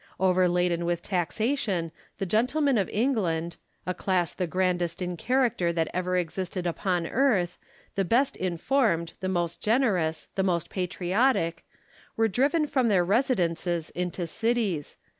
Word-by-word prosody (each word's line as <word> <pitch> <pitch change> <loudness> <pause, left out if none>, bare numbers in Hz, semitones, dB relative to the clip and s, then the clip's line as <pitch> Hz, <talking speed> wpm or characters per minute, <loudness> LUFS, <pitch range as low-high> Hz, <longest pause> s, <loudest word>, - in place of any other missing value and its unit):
Overladen 180 -2 +2
with 175 0 -1
taxation, 195 - -1 0.3
the 195 - -2
gentlemen 250 - +2
of 195 - -1
England 185 -9 0
— - - -42
a 180 - -1
class 180 -2 0
the 180 - -2
grandest 175 -1 0
in 180 -1 -3
character 235 -5 +1
that 165 -1 0
ever 180 0 0
existed 180 +1 -3
upon 175 0 0
earth, 200 -6 +1 0.3
the 195 - 0
best 240 +9 +2
informed, 180 -1 0
the 185 - -2
most 175 -2 -1
generous, 200 - +1
the 195 - 0
most 175 -4 0
patriotic 180 +1 0 0.3
— - - -28
were 225 0 +4
driven 280 - +2
from 260 -4 +1
their 190 -5 +3
residences 175 - 0
into 180 0 -3
cities. 220 -5 -1
185 Hz, 140 wpm, -27 LUFS, 175-225 Hz, 0.3 s, were